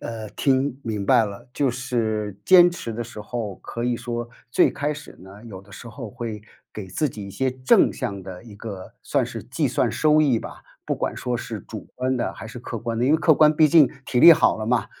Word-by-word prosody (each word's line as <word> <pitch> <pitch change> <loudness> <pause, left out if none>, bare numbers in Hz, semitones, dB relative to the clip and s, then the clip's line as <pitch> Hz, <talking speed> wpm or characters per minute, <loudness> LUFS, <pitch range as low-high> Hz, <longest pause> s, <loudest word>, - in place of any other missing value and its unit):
呃， 110 -2 -6
听 135 0 0
明 105 -3 -3
白 115 - +5
了。 100 +3 -9
就 140 -3 +1
是 110 -5 -2
坚 175 -1 +7
持 120 -9 -6
的 120 +1 -4
时 115 -2 -10
候， 105 -2 -5
可 120 0 -6
以 120 -1 0
说 120 0 -5 0.2
最 - - +4
开 145 +1 -2
始 145 0 -11
呢， 100 +4 -14
有 95 -5 -9
的 100 - -21
时 115 - -10
候 115 -1 -8
会 110 -2 -6 0.3
给 105 -3 -7
自 150 - -1
己 105 -4 -8
一 - - -9
些 130 +7 -1
正 130 0 +3
向 100 -1 -5
的 90 +1 -9
一 110 -4 -13
个 100 -4 -8
算 - - 0
是 - - -7
计 - - -2
算 - - 0
收 155 0 +3
益 135 -7 +3
吧， - - -10 0.2
不 - - -1
管 - - -3
说 125 -1 -2
是 110 -2 -6
主 110 - -9
观 130 0 -1
的 - - -2
还 - - -10
是 125 +2 -9
客 115 -1 -6
观 115 0 -4
的。 120 - +1
因 140 - +3
为 - - +5
客 160 -1 +4
观 155 +1 +5
毕 155 0 +5
竟 150 -4 +6 0.2
体 125 - -1
力 170 - +11
好 160 - +3
了 110 0 -5
嘛， 120 0 +1
120 Hz, 255 characters per minute, -23 LUFS, 105-130 Hz, 0.3 s, 力